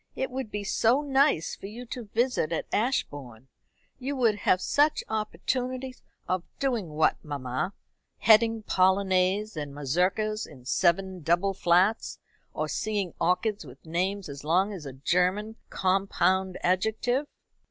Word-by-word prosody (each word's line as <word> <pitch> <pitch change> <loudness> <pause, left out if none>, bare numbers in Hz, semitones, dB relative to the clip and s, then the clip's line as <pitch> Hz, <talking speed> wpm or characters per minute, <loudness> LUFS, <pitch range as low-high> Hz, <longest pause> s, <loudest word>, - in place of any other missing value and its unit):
It 265 - -2
would 260 -3 -4
be 205 -1 -4
so 235 +7 +2
nice 275 - +2
for - - -9
you 235 +4 -8
to 240 0 -6
visit 230 -5 0
at 165 - -1
Ashbourne. 140 - -2 0.5
You 275 +2 -3
would 235 -5 +3
have 185 -2 +2
such 295 +10 +2
opportunities 250 +5 -3 0.2
" - - -42
"Of 185 -1 0 0.2
doing 240 -10 -1
what, 155 +1 +1
mamma? 140 +4 -3 0.4
Heading 225 +1 +4
polonaises 190 +2 +2
and 145 -2 -5
mazurkas 185 +10 0
in 125 -2 -15
seven 185 +4 +1
double 175 +5 +2
flats; 185 +4 +2 0.3
or - - -2
seeing 205 -5 -2
orchids 190 +4 +1
with 135 0 -14
names 185 +4 -1
as 140 -1 -8
long 185 +7 +2
as 165 -7 -7
a 135 - -7
German 180 - 0
compound 190 0 +1
adjective." 220 +9 +1
195 Hz, 140 wpm, -27 LUFS, 170-225 Hz, 0.5 s, Heading